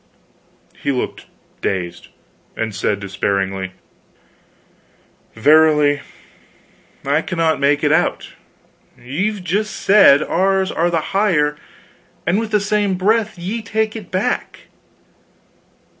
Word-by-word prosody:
He 140 - 0
looked 125 - -4 0.3
dazed, 90 -3 -3 0.5
and 110 -1 -3
said, 100 0 -1
despairingly: 95 -1 -2 1.6
"Verily, 150 +2 +4 1.0
I 145 +3 +2
cannot 165 -2 0
make 145 +1 +2
it 145 - +3
out. 160 +3 +1 0.7
Ye've 185 - -3
just 205 +3 -1
said 190 -8 +5
ours 190 +2 +1
are 170 +1 +1
the 165 -2 -2
higher, 170 -8 +2 0.7
and 175 +5 +2
with 225 -1 -3
the 210 -1 +2
same 205 -1 0
breath 215 +2 +1
ye 195 +7 -4
take 220 +1 -2
it 215 -5 -8
back." 200 +7 -2
170 Hz, 105 wpm, -18 LUFS, 140-205 Hz, 1.6 s, said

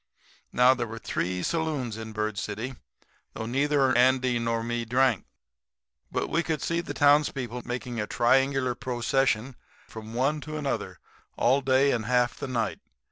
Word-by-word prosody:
"Now, 125 +1 +5
there 120 -2 -3
were 115 +1 -7
three 90 -4 -2
saloons 150 -9 -1
in 110 0 -7
Bird 110 -1 -2
City, 120 +5 -4 0.6
though 110 - -4
neither 135 +1 +2
Andy 130 0 +3
nor 115 -1 -1
me 120 0 -2
drank. 125 -2 +2 0.9
But - - -1
we 170 - +1
could 160 -3 -2
see 170 0 0
the - - -7
townspeople 145 -4 +2
making 120 -1 -4
a 105 - -2
triangular 135 +2 +2
procession 125 0 0 0.3
from 110 0 -9
one 140 +5 +1
to 155 +1 -6
another 145 -2 -3 0.4
all 130 +4 +3
day 135 +1 +3
and 115 -3 -1
half 125 -1 +2
the - - -5
night. 115 -4 -2
125 Hz, 155 wpm, -27 LUFS, 115-135 Hz, 0.9 s, Now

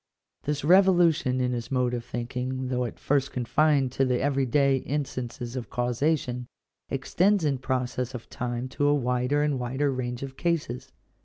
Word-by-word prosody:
This 150 0 -1
revolution 175 -6 +4
in 125 -1 +1
his 120 -1 -3
mode 125 -2 +1
of 120 -1 -2
thinking, 125 +2 -4
though 125 -1 0
at 120 - -6
first 140 -1 0
confined 135 +2 +2
to 135 - +1
the 125 -2 +1
every 135 -1 +1
day 140 +1 +3
in 145 +2 -2
stances 120 -2 -6
of 125 -2 -5
causation, 125 0 0 0.4
extends 180 +7 +2
in 140 -3 +1
process 125 -1 -2
of 120 - -8
time 120 0 -3
to 145 +2 0
a 145 - +4
wider 125 +2 +1
and 145 -3 0
wider 130 +4 0
range 125 -1 -3
of 135 -1 -7
cases. 140 -7 -2
130 Hz, 170 wpm, -27 LUFS, 125-145 Hz, 0.4 s, revolution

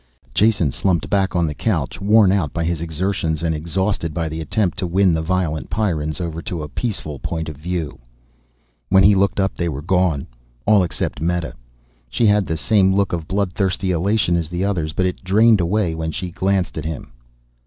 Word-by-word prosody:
Jason 100 -9 +3
slumped 90 0 0
back 95 -2 +1
on 85 -1 +2
the 75 - -2
couch, - - -2
worn 105 -1 +5
out 90 -8 +1
by 85 - -2
his 85 -1 -1
exertions 85 -1 -2
and 80 -1 +1
exhausted 85 +1 -2
by 85 -1 -1
the 80 +1 -5
attempt 95 +2 0
to 90 - -1
win 95 +1 +3
the 80 - 0
violent 80 -2 -1
Pyrrans 80 -7 -1
over 85 -2 -4
to 85 -2 -5
a - - -5
peaceful 75 - -4
point 80 +3 -3
of 80 - -6
view. 85 -1 -4 0.9
When 95 0 +5
he 105 - +7
looked 100 0 +1
up 95 0 +1
they 85 -1 -2
were 70 -2 -5
gone 90 -5 +1 0.4
all 105 -2 +5
except 85 -4 -3
Meta. 85 0 -1 0.6
She 115 - +1
had 105 -2 +3
the 80 - -2
same 95 +2 +3
look 100 -2 +1
of 85 -2 -3
blood 95 -2 -1
thirsty 95 -1 0
elation 90 +1 +1
as 85 -2 -1
the 90 +2 -2
others, 85 -6 -1
but 90 +4 0
it 90 - -3
drained 105 +2 +4
away 90 0 0
when 80 0 -3
she 90 +3 -4
glanced 95 -2 0
at 75 - -6
him. 80 -2 -5
90 Hz, 200 wpm, -20 LUFS, 80-95 Hz, 0.9 s, he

